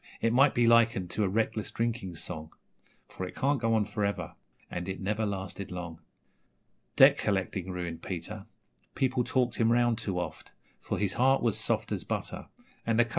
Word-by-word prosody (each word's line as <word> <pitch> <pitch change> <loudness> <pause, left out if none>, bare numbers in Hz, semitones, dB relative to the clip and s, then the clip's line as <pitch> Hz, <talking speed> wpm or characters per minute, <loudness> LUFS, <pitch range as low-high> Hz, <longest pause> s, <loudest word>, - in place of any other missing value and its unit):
it 115 0 +1
might 135 +3 +5
be 120 - +4
likened 115 -6 +4
to 105 - 0
a 95 - +1
reckless 110 +1 0
drinking 115 -6 -2
song, 80 -1 -7 0.6
For - - -7
it - - -10
can't 140 +1 +1
go 115 -1 +2
on 110 -2 +2
for 105 +1 -3
ever, 100 0 -2 0.3
and 85 +2 -5
it 95 - -4
never 105 +3 -1
lasted 95 -1 -5
long...... 85 -2 -6 1.0
Debt - - +7
collecting 95 -2 -1
ruined 85 -2 -4
Peter 95 +3 -6 0.5
people 130 -1 +1
talked 125 0 0
him 115 0 +3
round 120 -1 +3
too 95 -3 -3
oft, 85 -4 -6 0.3
For - - -3
his 100 -2 0
heart 135 +1 +3
was 115 -4 +2
soft - - 0
as - - -1
butter - - -3 0.4
(and 115 -1 +1
the 120 - +5
Co.' - - -13
105 Hz, 185 wpm, -29 LUFS, 95-115 Hz, 1.0 s, Debt